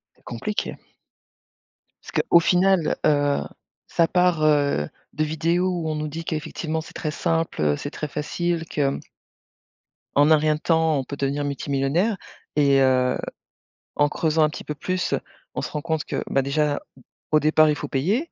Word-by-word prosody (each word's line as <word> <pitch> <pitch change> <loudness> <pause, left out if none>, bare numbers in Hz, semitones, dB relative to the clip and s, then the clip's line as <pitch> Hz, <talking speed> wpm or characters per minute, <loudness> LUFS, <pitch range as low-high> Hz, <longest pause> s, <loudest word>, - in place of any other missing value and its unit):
C'est - - -30
compliqué. 205 - -3 1.3
Parce - - -11 0.2
qu'au 170 - +8
final, 180 -1 +3
heu, 145 -1 +3 0.5
ça 165 - +2
part, 180 -3 +2
heu, 145 - +2 0.2
de 155 - 0
vidéos 165 +4 +1
où 170 -3 -2
on 155 - -1
nous 150 0 -2
dit 165 +3 -6
qu'effectivement 160 +1 -3
c'est - - -13
très 155 - -3
simple, 165 - -1
heu, 75 -1 +3
c'est 145 - -5
très 150 - -4
facile, 165 +3 -2
que 150 - -2
hem 140 0 +1 1.2
en 145 +2 +5
un - - +9
rien 155 0 +2
de 150 - -8
temps 160 -2 +2
on - - -2
peut 140 +2 -7
devenir 140 +1 -1
multimillionnaire. 140 - 0 0.4
Et 140 -2 +4
heu, 130 -1 +3 0.8
en 145 - +4
creusant 160 +1 +1
un 150 - +3
petit - - -8
peu 150 - -5
plus 185 +4 -1 0.4
on - - -1
se - - -4
rend 150 - -3
compte 160 -1 -1
que, - - -3
ben, 135 - +2
déjà 145 +1 0 0.5
au 155 - +5
départ, 155 +1 +4
il 150 - +2
faut 145 - -5
payer, 200 - 0
155 Hz, 175 wpm, -23 LUFS, 145-165 Hz, 1.3 s, un